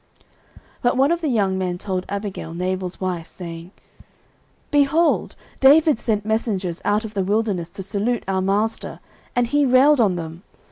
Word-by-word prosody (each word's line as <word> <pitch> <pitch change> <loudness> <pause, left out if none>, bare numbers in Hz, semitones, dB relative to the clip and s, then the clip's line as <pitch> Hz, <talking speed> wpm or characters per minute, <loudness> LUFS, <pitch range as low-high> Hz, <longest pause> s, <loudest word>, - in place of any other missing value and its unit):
09:025:014 - - -37 0.6
But 245 +1 +1
one 275 +4 +4
of 340 0 0
the 320 - -1
young 200 -7 +1
men 180 -1 -2
told 185 -1 -3
Abigail, 200 -5 -5
Nabal's 185 0 -3
wife, 180 -3 -3
saying, 170 -1 -8 1.0
Behold, 295 +3 +2 0.2
David 295 -1 +5
sent 210 -3 -1
messengers 200 -6 -1
out 210 +2 +1
of 215 - -8
the 195 -2 0
wilderness 200 -4 -1
to 195 - -8
salute 210 +5 -1
our 190 -1 0
master; 205 +4 -1 0.4
and 245 0 +3
he 290 +4 +2
railed 265 +1 +5
on 200 -5 +3
them. 165 0 -6
205 Hz, 160 wpm, -22 LUFS, 185-245 Hz, 1.0 s, David